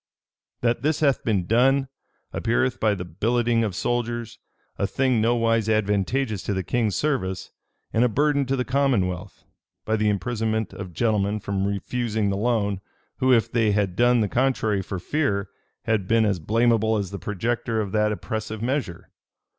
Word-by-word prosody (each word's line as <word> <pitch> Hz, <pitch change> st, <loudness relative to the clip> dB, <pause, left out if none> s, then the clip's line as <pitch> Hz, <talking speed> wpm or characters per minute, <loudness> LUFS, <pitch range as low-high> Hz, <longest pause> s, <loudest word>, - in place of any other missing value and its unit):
"That 120 Hz, -1 st, +1 dB
this 150 Hz, +3 st, 0 dB
hath 140 Hz, -3 st, +2 dB
been 100 Hz, -6 st, 0 dB
done, 135 Hz, +6 st, +3 dB, 0.5 s
appeareth 125 Hz, +2 st, 0 dB
by 110 Hz, -2 st, +2 dB
the 90 Hz, -2 st, -5 dB
billeting 115 Hz, +6 st, +1 dB
of 105 Hz, -5 st, -2 dB
soldiers, 120 Hz, 0 st, -2 dB, 0.4 s
a 100 Hz, -, +1 dB
thing 130 Hz, -1 st, +1 dB
nowise 115 Hz, -1 st, +2 dB
advantageous 110 Hz, +2 st, 0 dB
to 100 Hz, +3 st, -2 dB
the 95 Hz, -, -1 dB
king's 110 Hz, -1 st, 0 dB
service, 105 Hz, -12 st, -1 dB, 0.4 s
and 115 Hz, -, +3 dB
a 125 Hz, -, +3 dB
burden 140 Hz, +3 st, +1 dB
to 135 Hz, -, +1 dB
the 125 Hz, -1 st, -1 dB
commonwealth: 125 Hz, -10 st, 0 dB, 0.4 s
by 110 Hz, -, +1 dB
the 105 Hz, 0 st, +2 dB
imprisonment 110 Hz, +1 st, -1 dB
of 95 Hz, -3 st, -7 dB
gentlemen 105 Hz, -2 st, +1 dB
for 100 Hz, -, -7 dB
refusing 100 Hz, +2 st, -1 dB
the -, -, -1 dB
loan, 100 Hz, -3 st, 0 dB, 0.4 s
who, 130 Hz, 0 st, +2 dB
if 115 Hz, -3 st, +3 dB
they 110 Hz, -3 st, +2 dB
had 100 Hz, -3 st, 0 dB
done 120 Hz, +1 st, +4 dB
the 105 Hz, -, +1 dB
contrary 110 Hz, -4 st, +1 dB
for 95 Hz, +1 st, -5 dB
fear, 100 Hz, -, -1 dB, 0.3 s
had 110 Hz, -5 st, 0 dB
been 115 Hz, +1 st, +3 dB
as 100 Hz, -4 st, 0 dB
blamable 110 Hz, +4 st, +2 dB
as 100 Hz, -3 st, -3 dB
the 100 Hz, -, -5 dB
projector 115 Hz, +3 st, -2 dB
of 100 Hz, -3 st, -2 dB
that 105 Hz, 0 st, +2 dB
oppressive 110 Hz, +1 st, -4 dB
measure. 125 Hz, -9 st, -3 dB
110 Hz, 165 wpm, -24 LUFS, 100-120 Hz, 0.5 s, done